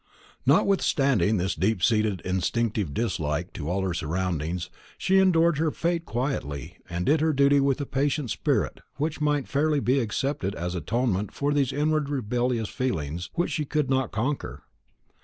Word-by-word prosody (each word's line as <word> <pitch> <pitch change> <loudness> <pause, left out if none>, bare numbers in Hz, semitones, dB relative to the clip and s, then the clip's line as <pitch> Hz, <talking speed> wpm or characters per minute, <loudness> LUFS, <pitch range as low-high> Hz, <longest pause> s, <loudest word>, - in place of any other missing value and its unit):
Notwithstanding 135 - +3
this 95 +1 0
deeply 95 +4 0
seated 110 -5 +2
instinctive 100 0 -1
dislike 85 -4 -2
to 75 -1 -5
all 95 +2 0
her 95 -2 -1
surroundings, 85 0 -2 0.3
she 190 +1 +3
endured 170 -4 +4
her 160 0 +2
fate 170 +2 -1
quietly, 115 - -3
and 90 0 -2
did 150 +1 +3
her 160 0 +2
duty 140 0 +4
with 135 0 +2
a - - -2
patient 140 -2 -1
spirit - - 0 0.2
which 155 +2 -2
might 150 -2 +1
fairly 150 +1 +1
be 130 +1 +2
accepted 130 -1 -2
as 90 +1 -3
an 90 - -2
atonement 105 - 0
for 145 +1 -1
those 140 -3 +2
inward 150 +1 0
rebellious 120 -3 -1
feelings 85 - -3
which 175 - 0
she 155 - -1
could 150 -1 -1
not 130 -3 +1
conquer. 130 +6 -3
125 Hz, 160 wpm, -26 LUFS, 95-145 Hz, 0.3 s, endured